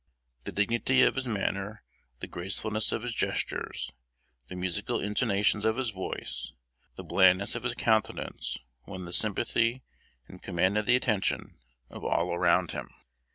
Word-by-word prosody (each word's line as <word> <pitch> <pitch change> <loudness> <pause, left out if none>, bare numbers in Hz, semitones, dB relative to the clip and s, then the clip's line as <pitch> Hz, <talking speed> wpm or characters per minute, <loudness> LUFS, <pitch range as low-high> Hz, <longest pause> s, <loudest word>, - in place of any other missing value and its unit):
The - - -3
dignity 115 +5 +3
of - - +4
his 130 -1 -3
manner, 105 -1 -2 0.4
the - - -4
gracefulness 105 +4 0
of 110 - -2
his 120 -1 -3
gestures, - - -2 0.6
the 90 - -8
musical 90 -1 -1
intonations 105 0 +1
of 110 +1 +2
his 130 -4 -1
voice, 95 -2 -4 0.4
the - - -8
blandness 95 +2 +4
of 120 - -3
his 120 0 -2
countenance, 110 -2 0 0.3
won 95 -2 -6
the 85 - -6
sympathy, 115 +4 +2 0.4
and 90 - -12
commanded 95 +4 +1
the 125 - +6
attention, 110 -6 0 0.4
of - - -9
all 85 +1 +1
around 85 - +3
him. - - -6
105 Hz, 145 wpm, -29 LUFS, 95-115 Hz, 0.6 s, the